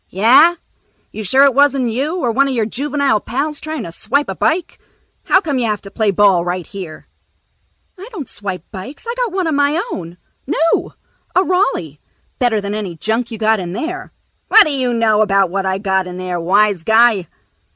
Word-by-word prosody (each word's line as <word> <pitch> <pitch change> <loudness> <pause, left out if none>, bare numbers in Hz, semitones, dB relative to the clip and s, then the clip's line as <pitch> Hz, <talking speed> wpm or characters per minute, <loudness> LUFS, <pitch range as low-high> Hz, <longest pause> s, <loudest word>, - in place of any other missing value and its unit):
"Yeah? 255 - +5 0.6
You 215 - -6
sure 260 +8 +4
it 280 -2 +5
wasn't 275 -3 +2
you 280 +9 -2
or 245 -9 0
one 275 +4 +2
of 270 - -2
your 225 -2 +1
juvenile 275 0 0
pals 280 +7 -3
trying 310 0 -5
to 170 - -7
swipe 275 - -1
a - - -3
bike? 340 +2 -1 0.5
How 375 - +4
come 290 -8 -2
you 235 - 0
have 210 -1 -2
to 195 - -10
play 220 -2 0
ball 195 -3 +3
right 175 0 -3
here?" 185 -6 -9 0.9
"I 390 - -9
don't 330 - -7
swipe 195 -4 -6
bikes. 245 - -9
I 470 - -3
got - - -2
one 375 -1 -1
of 320 - 0
my 285 +3 +2
own. 170 -1 -7 0.3
New. 330 +2 0 0.4
A 370 - +4
Raleigh. 270 - -1 0.4
Better 240 -4 +2
than 200 0 -4
any 205 -5 -4
junk 225 +7 -2
you 225 - -7
got 220 0 +2
in 175 -1 -5
there." 330 - -5 0.4
"What 440 - +7
d'you 265 -5 -1
know 225 -2 +2
about 195 -3 +2
what 195 0 -1
I 190 0 0
got 190 -2 -1
in 180 0 -7
there, 180 -1 -3
wise 200 +2 +2
guy?" 220 -1 +3
225 Hz, 195 wpm, -17 LUFS, 195-285 Hz, 0.9 s, What